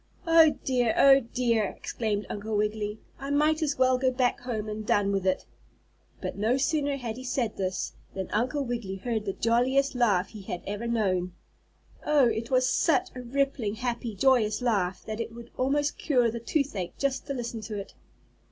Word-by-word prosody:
"Oh, 330 Hz, -2 st, +6 dB
dear! 245 Hz, -3 st, +1 dB
Oh, 275 Hz, 0 st, +8 dB
dear!" 235 Hz, -3 st, 0 dB
exclaimed 210 Hz, +1 st, -3 dB
Uncle 210 Hz, +1 st, -3 dB
Wiggily. 210 Hz, 0 st, -1 dB, 0.2 s
"I 275 Hz, -, -5 dB
might 305 Hz, +2 st, +2 dB
as 300 Hz, -3 st, 0 dB
well 255 Hz, 0 st, +3 dB
go 260 Hz, 0 st, +3 dB
back 250 Hz, -1 st, +1 dB
home 230 Hz, -4 st, -4 dB
and 215 Hz, 0 st, -4 dB
done 205 Hz, -1 st, +2 dB
with 195 Hz, -1 st, -1 dB
it." 185 Hz, -, +1 dB, 0.7 s
But -, -, -4 dB
no 220 Hz, +5 st, +1 dB
sooner 285 Hz, 0 st, 0 dB
had 235 Hz, -3 st, -5 dB
he 255 Hz, -, -7 dB
said 250 Hz, -3 st, -1 dB
this, 185 Hz, -1 st, -2 dB, 0.2 s
than 190 Hz, -1 st, -3 dB
Uncle 255 Hz, +6 st, 0 dB
Wiggily 235 Hz, -6 st, -3 dB
heard 220 Hz, +2 st, -3 dB
the 195 Hz, -, -2 dB
jolliest 255 Hz, +6 st, +2 dB
laugh 205 Hz, -7 st, +2 dB
he 215 Hz, -2 st, -10 dB
had 180 Hz, -2 st, -6 dB
ever 205 Hz, +4 st, -4 dB
known. 185 Hz, -6 st, 0 dB, 0.7 s
Oh! 295 Hz, -3 st, +4 dB
it 230 Hz, 0 st, -2 dB
was 255 Hz, -1 st, +3 dB
such 315 Hz, -6 st, +2 dB
a 250 Hz, -, -7 dB
rippling, 250 Hz, -4 st, -1 dB
happy 235 Hz, -2 st, -3 dB
joyous 225 Hz, -1 st, +3 dB
laugh 195 Hz, -7 st, 0 dB
that 220 Hz, 0 st, -5 dB
it 230 Hz, 0 st, -4 dB
would 235 Hz, 0 st, -11 dB
almost 285 Hz, +3 st, 0 dB
cure 245 Hz, -6 st, +2 dB
the 235 Hz, -, -5 dB
toothache 230 Hz, -, -2 dB
just 275 Hz, 0 st, -1 dB
to 275 Hz, -, -3 dB
listen 235 Hz, -2 st, -4 dB
to 215 Hz, 0 st, -5 dB
it. 200 Hz, -, -7 dB
235 Hz, 185 wpm, -28 LUFS, 210-265 Hz, 0.7 s, Oh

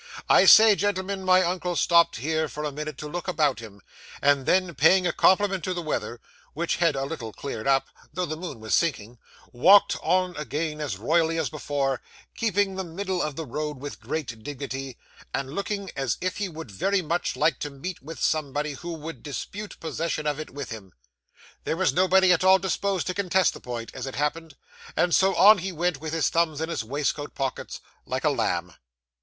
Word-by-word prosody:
I -, -, +6 dB
say, 220 Hz, 0 st, +9 dB
gentlemen, 195 Hz, -1 st, -2 dB
my 185 Hz, 0 st, +5 dB
uncle 180 Hz, 0 st, -2 dB
stopped 170 Hz, 0 st, +4 dB
here, 155 Hz, +5 st, -1 dB
for 150 Hz, 0 st, -6 dB
a 150 Hz, -, -2 dB
minute, 150 Hz, 0 st, -6 dB
to 150 Hz, -, -6 dB
look 175 Hz, +5 st, -5 dB
about 150 Hz, -7 st, +1 dB
him; 105 Hz, -3 st, -11 dB, 0.4 s
and 140 Hz, -1 st, +2 dB
then, 185 Hz, -2 st, +2 dB
paying 165 Hz, +7 st, +4 dB
a 175 Hz, -, +1 dB
compliment 190 Hz, -2 st, +3 dB
to 185 Hz, -, -2 dB
the 175 Hz, -, -4 dB
weather, 120 Hz, -6 st, -3 dB, 0.4 s
which 170 Hz, +2 st, -1 dB
had 170 Hz, -4 st, +2 dB
a 135 Hz, 0 st, -2 dB
little 135 Hz, -7 st, -6 dB
cleared 110 Hz, -2 st, -6 dB
up, 135 Hz, 0 st, +3 dB, 0.2 s
though 180 Hz, +4 st, -2 dB
the 155 Hz, -, -4 dB
moon 160 Hz, -7 st, -7 dB
was 110 Hz, 0 st, -4 dB
sinking, 120 Hz, -8 st, 0 dB, 0.3 s
walked 190 Hz, +12 st, +6 dB
on 180 Hz, +1 st, +1 dB
again, 150 Hz, +2 st, -3 dB
as 140 Hz, -10 st, -3 dB
royally 165 Hz, -, +1 dB
as 160 Hz, -3 st, -1 dB
before; 140 Hz, -3 st, -2 dB, 0.3 s
keeping 205 Hz, -3 st, +1 dB
the 190 Hz, -, -2 dB
middle 185 Hz, +1 st, -3 dB
of 150 Hz, -2 st, -2 dB
the 160 Hz, -, -5 dB
road 150 Hz, +2 st, -4 dB
with 145 Hz, +2 st, -8 dB
great 125 Hz, -8 st, -5 dB
dignity, 135 Hz, -1 st, -6 dB, 0.4 s
and 135 Hz, 0 st, -4 dB
looking 200 Hz, +1 st, -3 dB
as 135 Hz, -3 st, -1 dB
if 185 Hz, 0 st, -2 dB
he 205 Hz, -2 st, -2 dB
would 160 Hz, -8 st, -9 dB
very 195 Hz, -, 0 dB
much 170 Hz, +3 st, -1 dB
like 155 Hz, -3 st, +1 dB
to 145 Hz, -, -3 dB
meet 145 Hz, +6 st, -7 dB
with 155 Hz, +4 st, -9 dB
somebody 150 Hz, -1 st, -1 dB
who 170 Hz, +5 st, -6 dB
would 160 Hz, +1 st, -8 dB
dispute 200 Hz, -, -7 dB
possession 160 Hz, -1 st, -3 dB
of 150 Hz, 0 st, -1 dB
it 155 Hz, -, -6 dB
with 140 Hz, -2 st, -7 dB
him. 100 Hz, -5 st, -9 dB, 0.7 s
There 160 Hz, -, -2 dB
was 190 Hz, -, +2 dB
nobody 185 Hz, 0 st, +5 dB
at 175 Hz, -, 0 dB
all 190 Hz, 0 st, +7 dB
disposed 190 Hz, -1 st, -1 dB
to 185 Hz, -, -2 dB
contest 185 Hz, -1 st, +2 dB
the -, -, -11 dB
point, 120 Hz, -2 st, -6 dB
as -, -, -6 dB
it 135 Hz, -, -6 dB
happened; 155 Hz, +1 st, -2 dB, 0.4 s
and 175 Hz, -, +2 dB
so, 190 Hz, 0 st, +4 dB
on 210 Hz, +1 st, +7 dB
he 190 Hz, +2 st, -4 dB
went, 175 Hz, -3 st, -1 dB
with 160 Hz, -1 st, -4 dB
his 165 Hz, -2 st, +1 dB
thumbs 165 Hz, -3 st, +1 dB
in 160 Hz, +1 st, -3 dB
his 165 Hz, -, -2 dB
waistcoat 145 Hz, +4 st, -3 dB
pockets, 135 Hz, -1 st, -4 dB, 0.3 s
like -, -, -3 dB
a -, -, +3 dB
lamb. -, -, -1 dB
160 Hz, 200 wpm, -25 LUFS, 140-185 Hz, 0.7 s, say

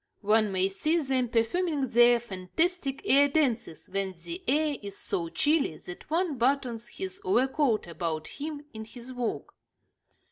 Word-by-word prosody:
One 215 Hz, 0 st, +3 dB
may 190 Hz, 0 st, +2 dB
see 305 Hz, -, 0 dB
them 265 Hz, -4 st, 0 dB
performing 290 Hz, +8 st, +1 dB
their 240 Hz, +1 st, +6 dB
fantastic 270 Hz, -, -1 dB
air 285 Hz, -4 st, +6 dB
dances 255 Hz, -, 0 dB
when 195 Hz, 0 st, -2 dB
the 175 Hz, +1 st, -6 dB
air 295 Hz, +2 st, +2 dB
is 200 Hz, -1 st, -7 dB
so 170 Hz, -2 st, -2 dB
chilly 285 Hz, -, +1 dB
that 180 Hz, -, -10 dB
one 325 Hz, -4 st, 0 dB
buttons 245 Hz, -2 st, 0 dB
his 380 Hz, +5 st, -6 dB
overcoat 265 Hz, -, +2 dB
about 160 Hz, -2 st, -4 dB
him 295 Hz, 0 st, -6 dB
in 220 Hz, 0 st, -7 dB
his 240 Hz, +3 st, -10 dB
walk. 245 Hz, -2 st, -3 dB
245 Hz, 145 wpm, -28 LUFS, 200-295 Hz, -, their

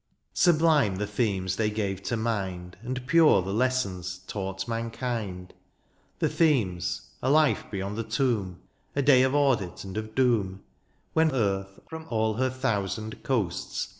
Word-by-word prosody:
Sublime 155 Hz, -, +4 dB
the 105 Hz, +2 st, -2 dB
themes 100 Hz, -4 st, -1 dB
they 110 Hz, -1 st, +1 dB
gave 100 Hz, -3 st, -2 dB
to 120 Hz, -, -2 dB
mind. 95 Hz, -6 st, -3 dB
And 125 Hz, +1 st, -4 dB
pure 155 Hz, -, +5 dB
the 95 Hz, +2 st, -3 dB
lessons 100 Hz, -7 st, -1 dB
taught 95 Hz, -1 st, -4 dB
mankind. 115 Hz, -5 st, -4 dB, 0.6 s
The -, -, +1 dB
themes 115 Hz, -, +1 dB
— -, -, -32 dB
^a 130 Hz, -, +1 dB
life 155 Hz, -1 st, +3 dB
beyond 100 Hz, +2 st, -4 dB
the -, -, -1 dB
tomb— 110 Hz, -6 st, -1 dB, 0.3 s
A 140 Hz, -, +1 dB
day 130 Hz, -2 st, +6 dB
of 130 Hz, +2 st, +2 dB
audit 130 Hz, -11 st, +1 dB
and 95 Hz, -1 st, -8 dB
of 110 Hz, 0 st, -5 dB
doom. 105 Hz, -7 st, +1 dB, 0.5 s
When 160 Hz, 0 st, +3 dB
earth, 95 Hz, -6 st, -1 dB
from 160 Hz, 0 st, -8 dB
all 110 Hz, -1 st, +1 dB
her 130 Hz, +1 st, +2 dB
thousand 110 Hz, -4 st, -2 dB
coasts. 115 Hz, -10 st, -2 dB
110 Hz, 150 wpm, -27 LUFS, 95-130 Hz, 0.6 s, day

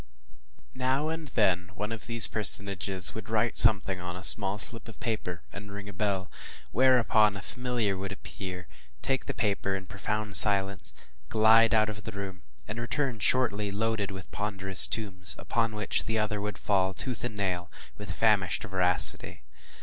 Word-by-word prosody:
Now 130 Hz, +4 st, -1 dB
and 160 Hz, -1 st, -5 dB
then 95 Hz, -7 st, 0 dB
one 105 Hz, +2 st, -5 dB
of 115 Hz, 0 st, -6 dB
these 115 Hz, -1 st, +6 dB
personages 100 Hz, -3 st, 0 dB
would 110 Hz, 0 st, -9 dB
write 115 Hz, +1 st, 0 dB
something 95 Hz, -4 st, +4 dB
on 90 Hz, 0 st, -7 dB
a 90 Hz, -, -9 dB
small 100 Hz, -1 st, +5 dB
slip 110 Hz, +3 st, +2 dB
of 115 Hz, -, -12 dB
paper, 105 Hz, -6 st, -4 dB
and 100 Hz, 0 st, -10 dB
ring 100 Hz, 0 st, -8 dB
a 100 Hz, -, -9 dB
bell, 95 Hz, -1 st, -3 dB, 0.4 s
whereupon 115 Hz, -5 st, +3 dB
a -, -, -8 dB
familiar 125 Hz, -5 st, -2 dB
would 95 Hz, +1 st, -6 dB
appear, 90 Hz, -2 st, -8 dB, 0.4 s
take 135 Hz, -1 st, -2 dB
the -, -, -3 dB
paper 100 Hz, -3 st, -1 dB
in 95 Hz, 0 st, -6 dB
profound 105 Hz, +1 st, -3 dB
silence, 100 Hz, -2 st, +3 dB, 0.3 s
glide 110 Hz, +1 st, +4 dB
out 110 Hz, -1 st, +3 dB
of 105 Hz, -1 st, -6 dB
the 110 Hz, -, -7 dB
room, 95 Hz, -2 st, -7 dB, 0.3 s
and 110 Hz, +3 st, -6 dB
return 120 Hz, 0 st, -3 dB
shortly 105 Hz, -3 st, +1 dB
loaded 105 Hz, 0 st, -2 dB
with 95 Hz, -1 st, -10 dB
ponderous 95 Hz, -2 st, +4 dB
tomes, 95 Hz, -5 st, +1 dB
upon 115 Hz, -2 st, -2 dB
which 105 Hz, -1 st, -1 dB
the 115 Hz, 0 st, -2 dB
other 105 Hz, -1 st, -2 dB
would 105 Hz, 0 st, -5 dB
fall, 95 Hz, -2 st, 0 dB
tooth 125 Hz, +1 st, -3 dB
and 120 Hz, -3 st, -4 dB
nail, 90 Hz, -3 st, -3 dB, 0.3 s
with 105 Hz, -, -10 dB
famished 105 Hz, -5 st, +1 dB
voracity. 90 Hz, -9 st, +2 dB
105 Hz, 165 wpm, -27 LUFS, 95-115 Hz, 0.4 s, these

